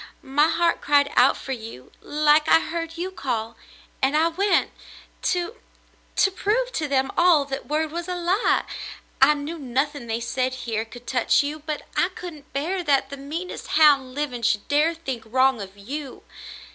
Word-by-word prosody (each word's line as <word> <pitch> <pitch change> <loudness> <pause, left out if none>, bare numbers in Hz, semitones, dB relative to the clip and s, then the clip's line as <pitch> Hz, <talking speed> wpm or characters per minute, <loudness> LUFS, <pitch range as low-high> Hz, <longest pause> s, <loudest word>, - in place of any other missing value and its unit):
My 290 +2 +3
heart 340 0 +1
cried 285 0 +3
out 255 - +5
for 270 - -7
you 225 - -7
— - - -35
like 300 +1 +3
I 325 - +7
heard 330 0 -5
you 365 +2 -3
call 235 -9 -3 0.2
— - - -28
and 275 +3 +2
I 325 +2 +3
went 370 +2 +1 0.3
— - - -26
to 360 +6 -2 0.3
— - - -35
to 390 - +4
prove 455 +6 0
to 310 -8 -2
them 270 -1 +1
all 345 -5 +5
that 270 -1 -6
word 305 +1 -1
was 340 +1 -4
a 360 - -2
lie. 360 +5 +1 0.6
I 295 +3 +7
knew 300 +3 -6
nothing 270 0 -2
they 225 0 -1
said 255 +2 -1
here 225 -1 -2
could 240 +2 -13
touch 250 +2 +2
you, 295 +2 -4
but 305 0 -5
I 355 - +2
couldn't 340 -6 -10
bear 335 +7 -2
that 280 -4 +2
the 280 - -6
meanest 315 +7 -6
hound 275 -5 +5
living 280 -5 -3
should 220 -3 +1
dare 305 +3 +2
think 265 -8 -5
wrong 260 0 +2
of 195 0 -9
you. 265 +6 -7
290 Hz, 190 wpm, -24 LUFS, 260-330 Hz, 0.6 s, I